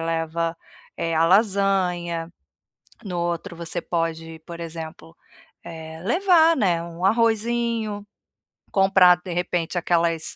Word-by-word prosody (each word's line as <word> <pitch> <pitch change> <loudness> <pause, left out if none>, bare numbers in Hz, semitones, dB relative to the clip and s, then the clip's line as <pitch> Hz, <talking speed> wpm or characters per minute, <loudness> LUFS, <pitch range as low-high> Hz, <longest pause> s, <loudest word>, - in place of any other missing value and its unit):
leva, 165 0 -2 0.4
eh, 165 -1 -2
a 160 +1 +3
lasanha, 180 -4 +1 0.7
no 180 -4 -5
outro 170 0 -3
você 170 -1 -4
pode, 165 -1 -3
por 170 0 -9
exemplo, 160 - -8 0.5
eh, 160 0 -9
levar, 335 - +4
né, 175 - +1
um 170 +1 -8
arrozinho, 225 0 0 0.7
comprar, 190 -2 +5
de 180 - -6
repente, 175 0 -2
aquelas 170 -2 0
175 Hz, 110 wpm, -23 LUFS, 165-200 Hz, 0.7 s, comprar